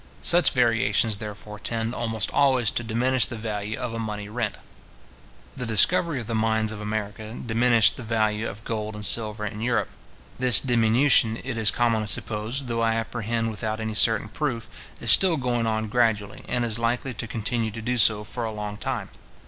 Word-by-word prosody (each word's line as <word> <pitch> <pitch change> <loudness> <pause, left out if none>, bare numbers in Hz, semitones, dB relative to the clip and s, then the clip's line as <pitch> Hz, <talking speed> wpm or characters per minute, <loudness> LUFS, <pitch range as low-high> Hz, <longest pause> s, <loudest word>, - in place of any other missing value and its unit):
Such 175 -3 +4
variations, 115 -3 +2
therefore, 105 0 -8
tend 115 +1 -2
almost 110 -4 -2
always 130 -5 +3
to 120 - -3
diminish 120 +3 +2
the 120 - -6
value 110 -1 -4
of 125 -2 -4
a 115 - -4
money 105 -2 -5
rent. 110 -2 -2 1.0
The 125 -3 -4
discovery 150 - +3
of 120 - -6
the 115 - -4
mines 110 0 +1
of 105 -1 -7
America 105 +1 -4
diminished 115 -1 +3
the - - -7
value 110 -1 0
of 105 +3 -11
gold 110 -2 -4
and 105 0 -4
silver 105 -1 0
in 105 +1 -5
Europe. 120 0 0 0.5
This 125 -2 +6
diminution, 120 -1 +3
it 130 -1 -4
is 110 -2 +2
commonly 115 -3 +1
supposed, 110 +6 -2
though 115 -1 -2
I 115 -1 +2
apprehend 115 0 -2
without 110 0 -3
any 110 0 -3
certain 110 0 +2
proof, 120 -3 -3 0.3
is 115 - +3
still 180 -4 +5
going 120 -3 -1
on 110 0 -1
gradually, 105 -3 0
and 120 -1 0
is 115 -1 -1
likely 120 +3 -1
to 120 - -6
continue 115 +1 -2
to 110 +2 -8
do 125 +1 -1
so 105 -1 +4
for 115 +3 -4
a 110 - -2
long 105 -1 -5
time. 120 -4 -4
115 Hz, 185 wpm, -25 LUFS, 110-120 Hz, 1.0 s, This